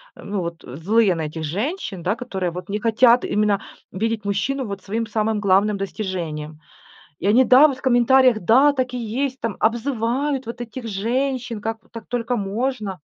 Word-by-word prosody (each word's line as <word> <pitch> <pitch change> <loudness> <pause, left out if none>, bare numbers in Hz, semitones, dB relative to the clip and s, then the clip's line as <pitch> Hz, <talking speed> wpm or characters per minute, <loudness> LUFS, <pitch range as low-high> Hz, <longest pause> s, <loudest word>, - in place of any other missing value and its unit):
ну 200 -1 -4
вот, 170 -1 -5
злые 185 - +1
на 165 - -3
этих 155 +1 -6
женщин, 200 - -3
да, 190 +5 0
которые 190 -8 -3
вот 180 +3 -8
не 210 +1 -2
хотят 235 +2 +4
именно 210 -1 +1 0.3
видеть 225 +2 -2
мужчину 225 +7 -1
вот 200 -2 -6
своим 225 +3 -3
самым 215 0 0
главным 200 +1 +2
достижением. 170 -6 -5 0.6
И 185 - -2
они, 235 +6 +5
да, 260 +4 +7
вот 275 -4 -3
в - - -15
комментариях: 255 -1 +4
"Да, 255 +10 +5
так 255 -3 -2
и - - -2
есть". 255 +4 -3
Там 225 -4 -3
обзывают 250 +4 0
вот 235 +1 -7
этих 240 +1 -7
женщин, 240 +3 -2
как 225 +2 -4
так 230 -2 -9
только 245 0 -2
можно. 210 -1 -3
220 Hz, 175 wpm, -22 LUFS, 195-250 Hz, 0.6 s, да